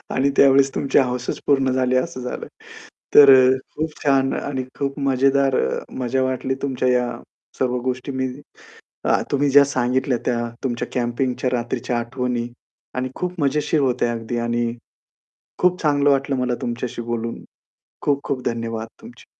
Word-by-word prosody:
आणि 135 +2 +2
त्यावेळेस 135 0 +5
तुमची 140 - +2
हौसच 125 -1 -1
पूर्ण 135 -2 +3
झाली 130 0 +1
असं 130 0 -2
झालं. 125 - -5 0.7
तर 140 -1 +10
अ, 130 0 +6 0.3
खूप 155 0 -3
छान 135 -1 +3
आणि 130 -2 -3
खूप 140 +1 -2
मजेदार 135 0 +2
अ, 65 - 0 0.2
मजा 130 +1 0
वाटली 130 0 -1
तुमच्या 130 -2 0
या 125 -1 +2 0.5
सर्व 125 -1 0
गोष्टी 130 +2 -3
मी 130 0 -1 0.8
अ, - - +3
तुम्ही 140 0 +2
ज्या 140 +1 +7
सांगितल्या 130 -1 0
त्या. 120 -1 +1 0.3
तुमच्या 120 -3 -2
कॅम्पिंगच्या 125 +1 -1
रात्रीच्या 120 0 -2
आठवणी 120 0 -2 0.5
आणि 130 0 -2
खूप 180 -1 -4
मजेशीर 150 +2 +1
होत्या 125 -3 +1
अगदी. 115 +1 -4
आणि 120 0 -1 0.9
खूप 180 0 +2
चांगलं 145 -2 +3
वाटलं 140 0 +1
मला 125 -1 0
तुमच्याशी 120 0 -4
बोलून. 115 0 -4 0.6
खूप 140 -1 +1
खूप 130 -2 -3
धन्यवाद 115 -1 -3
तुमचे. 235 +2 -14
130 Hz, 150 wpm, -21 LUFS, 125-140 Hz, 0.9 s, तर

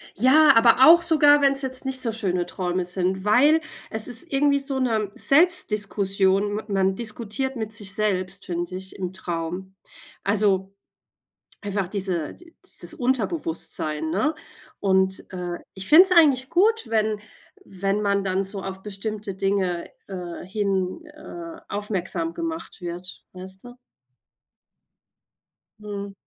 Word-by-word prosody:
Ja, 285 +7 +6
aber 235 +3 +6
auch 340 +1 +8
sogar, 295 -3 +5
wenn's 275 0 +3
jetzt 260 0 -1
nicht 265 -1 -1
so 230 -3 +1
schöne 185 -5 -1
Träume 180 0 -3
sind, 185 +1 -2
weil 290 +9 +4 0.3
es 220 0 +2
ist 250 +8 +2
irgendwie 280 0 +2
so 275 -1 -3
'ne 220 -5 -1
Selbstdiskussion, 205 - +2
ma 215 - -4
man 195 -2 +1
diskutiert 235 +4 -4
mit 220 -2 -5
sich 200 -2 -1
selbst, 195 -3 -2
finde 175 +1 -4
ich, 190 0 -7
im 185 -2 -4
Traum. 180 +1 -5 0.5
Also, 195 -2 +2 0.9
einfach 200 -2 -3
diese 185 -5 -2
d 345 -1 -19
dieses - - -6
Unterbewusstsein, 170 - -2
ne? 300 - 0 0.4
Und 190 -1 +1
äh, 175 -1 -4 0.2
ich 190 0 -6
finde 325 +4 +9
es 380 - 0
eigentlich 280 -7 +4
gut, 435 +6 +2
wenn 215 -1 0 0.5
wenn 195 +2 -2
man 200 -1 0
dann 190 0 -1
so 195 0 -2
auf 190 0 -7
bestimmte 210 0 -5
Dinge, 190 -2 -1 0.2
äh, 180 -3 -7
hin 195 - -2
äh, 325 +2 -10
aufmerksam 205 - -3
gemacht 330 - -6
wird, 175 +1 -7
weißt 190 +1 -9
du? 245 0 -12 2.0
Mhm. 200 -1 -7
205 Hz, 135 wpm, -23 LUFS, 190-265 Hz, 2.0 s, finde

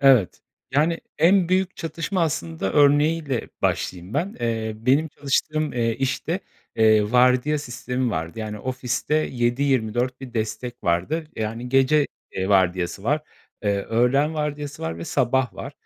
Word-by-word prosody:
evet. 130 - +4 0.3
Yani, 160 +4 +2 0.2
en 180 +1 +4
büyük 185 0 +1
çatışma 165 +3 -2
aslında 95 - -2
örneği 145 +3 +4
ile 130 -5 -2
başlayayım 90 +5 -1
ben. 175 +7 -1
Eee, 115 -2 -1
benim 135 +8 +2
çalıştığım, 150 +2 -1
eee, 115 -2 0
işte, 145 +7 -1 0.4
eee, 110 -1 +4
vardiya 125 +4 +4
sistemi 125 -2 -3
vardı. 80 +5 -4
Yani, 105 -1 -4
ofiste 130 +4 -2
7-24 125 -3 0
bir 125 -2 -9
destek 115 +1 -4
vardı. 90 - 0
Yani, 115 +3 -3
gece, 135 +3 +4 0.3
eee, 95 +1 -2
vardiyası 95 -1 +2
var, 150 +7 +1 0.4
eee, 100 -1 +2
öğlen 135 +7 +2
vardiyası 150 -1 -4
var 80 +1 -3
ve 85 - -5
sabah 130 -2 +1
var. - - -7
125 Hz, 140 wpm, -23 LUFS, 110-150 Hz, 0.4 s, evet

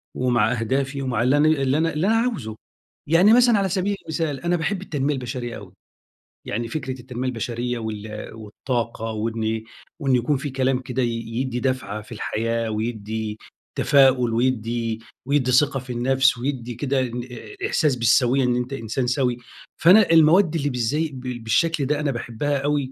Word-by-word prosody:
ومع 120 -3 +2
أهدافي 135 +4 -1
ومع 125 -3 0
اللي 130 +4 +3
أنا 150 - +4
اللي 140 -2 +2
أنا 165 0 +1
اللي 160 +6 0
أنا 225 - +3
عاوزه. 190 - -2 0.5
يعني 180 +7 +6
مثلًا 240 -2 +5
على 195 -1 +1
سبيل 200 +2 0
المثال، 160 -3 -2
أنا 175 +1 +1
باحب 180 +4 -2
التنمية 145 -5 -1
البشرية 125 -2 -5
أوي. - - -12 0.7
يعني 115 +3 -3
فكرة 130 -1 -4
التنمية 125 +1 -4
البشرية 120 0 -3
وال 105 -1 -6
والطاقة 115 +1 -4
وإن 110 0 -2 0.4
وإن 135 -3 +2
يكون 125 +4 +1
في 145 +2 -4
كلام 130 0 0
كده 130 0 -3
ي - - +2 0.2
يدّي 125 +1 -2
دفعة 120 -6 -2
في 105 - -17
الحياة 115 +1 -2
ويدّي 110 -1 -3 0.4
تفاؤل 130 -4 +4
ويدّي 115 -2 -1 0.3
ويدّي 135 -2 +1
ثقة 135 +1 +3
في 125 -1 -7
النفس 130 +2 +2
ويدّي 125 -2 -4
كده 135 +2 0
إن 120 -1 -3
أ 395 - -6
إحساس 150 - +2
بالسويّة 125 +2 +3
إن 125 -1 +2
أنت 125 +2 -3
إنسان 120 +1 -2
سَوِي. 125 -1 +1 0.4
فأنا 185 +3 +6
المواد 165 +2 +5
اللي 145 -2 0
بالزي 140 +6 -1
بالشكل 130 +5 0
ده 150 +2 0
أنا 150 -2 0
باحبّها 125 +4 -2
أوي. 140 -1 -1
130 Hz, 165 wpm, -23 LUFS, 115-145 Hz, 0.7 s, يعني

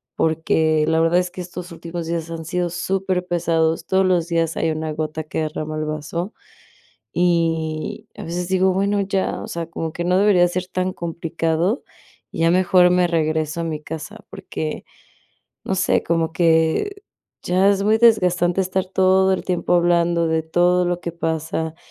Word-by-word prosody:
porque 160 -1 +1
la 160 0 +2
verdad 165 +2 +3
es 180 -1 -2
que 185 - -10
estos 180 0 -8
últimos 170 0 -6
días 165 -1 -3
han 165 -1 -5
sido 175 +1 -1
superpesados, 175 -3 0
todos 190 0 +2
los 175 -3 +2
días 165 -2 0
hay 165 - +1
una 155 0 -3
gota 155 0 -3
que 155 - -4
derrama 155 0 -4
el 155 - -2
vaso, 155 +6 -4 0.8
y 165 -3 0
a - - -6
veces 175 +1 -4
digo: 190 0 +3
"Bueno, 200 +2 +1
ya, 195 -1 -1
o - - -7
sea, 170 -1 -4
como 165 -1 -5
que 175 - -3
no 180 +1 +3
debería 190 -4 +5
ser 180 +1 -3
tan 185 0 -2
complicado", 165 - -1 0.5
y - - -7
ya 165 - +4
mejor 180 0 +4
me 180 0 +3
regreso 160 -1 -1
a - - -2
mi 155 -2 -4
casa, 160 +8 -8
porque, 170 -5 -5 0.8
no 190 - -1
sé, 185 - +2
como 165 -1 0
que 170 - +1 0.4
ya 185 +2 +3
es 200 0 +1
muy 215 +2 +3
desgastante 180 -5 +3
estar 185 +1 -1
todo 190 0 +3
el - - -3
tiempo 180 -1 +1
hablando 170 -1 +2
de 160 0 +1
todo 175 +2 +2
lo 175 0 -1
que 170 - -4
pasa, 160 -1 -2
170 Hz, 175 wpm, -21 LUFS, 160-185 Hz, 0.8 s, debería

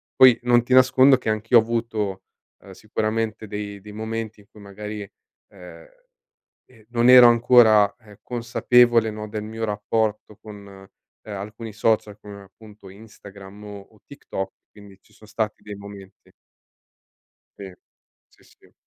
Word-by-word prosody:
poi 125 -3 +6
non 120 -1 +3
ti 125 - -2
nascondo 130 +1 +5
che 125 - -5
anch'io 110 +3 +2
ho - - +2
avuto, 110 -4 -4 0.4
ehm, - - -14
sicuramente 110 0 -4
dei 105 -1 -7
dei 105 +2 -12
momenti 110 0 -6
in 100 - -21
cui 105 - -17
magari, 105 +1 -8 0.5
ehm, - - -14 0.8
eh, 115 -4 -23
non 120 0 +1
ero 125 -1 +9
ancora, 115 -3 +5
uhm, 105 -2 -17
consapevole, 120 -1 +2
no, 105 0 -7
del 105 0 -6
mio 110 +1 -7
rapporto 105 0 -3
con 100 -2 -13 0.4
alcuni 105 +2 -8
social, 105 -1 -1
come 100 -1 -12
appunto 105 0 -17
Instagram 100 -1 -14
o 105 -1 -9
o 105 +2 -23
TikTok, 95 -9 -7 0.2
quindi 100 -2 -17
ci - - -28
son 110 - -19
stati 110 0 -4
dei 105 -1 -9
momenti. 100 -1 -14 1.3
Sì, 95 -2 -10 0.6
sì, - - -28
sì. - - -25
110 Hz, 145 wpm, -22 LUFS, 100-115 Hz, 1.3 s, ero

